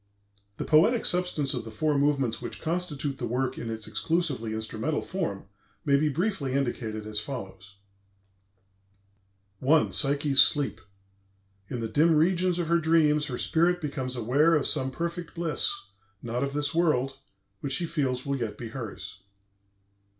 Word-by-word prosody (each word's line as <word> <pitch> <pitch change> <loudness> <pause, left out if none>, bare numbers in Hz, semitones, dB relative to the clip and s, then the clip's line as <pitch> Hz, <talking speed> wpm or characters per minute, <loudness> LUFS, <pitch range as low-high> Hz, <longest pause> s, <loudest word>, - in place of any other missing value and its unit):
The - - -4
poetic 215 +10 +4
substance 175 -6 +2
of - - -3
the 110 - -8
four 150 +8 0
movements 140 -4 +1
which - - -6
constitute 155 -5 -2
the - - -2
work 125 +2 -1
in 115 - -5
its 110 -1 -4
exclusively 115 +2 -1
instrumental 110 +7 -2
form 165 - -4 0.4
may 140 -2 +4
be 150 +2 +2
briefly 155 -3 -1
indicated 115 -5 -2
as 105 -1 -1
follows: 100 -4 -8 1.9
I. 155 +4 +4
PSYCHE'S 140 -1 +4
SLEEP 145 -1 +3 0.9
"In 125 - -4
the 115 - -2
dim 155 +8 +3
regions 180 +2 +2
of 175 -2 -1
her 170 +1 +3
dreams, 155 -2 +3
her 125 -4 -4
spirit 175 +5 +2
becomes 135 -5 -4
aware 140 +8 +3
of 145 - +1
some 130 - +1
perfect 170 +4 -5
bliss, 170 - 0 0.5
not 120 +2 -2
of 140 0 -2
this 145 +2 -1
world, 135 -5 +1 0.4
which 135 +4 -2
she 170 +5 +1
feels 135 -6 -2
will 140 0 -1
yet 110 -4 -4
be 115 - -7
hers." 110 -5 -7
140 Hz, 150 wpm, -27 LUFS, 120-165 Hz, 1.9 s, poetic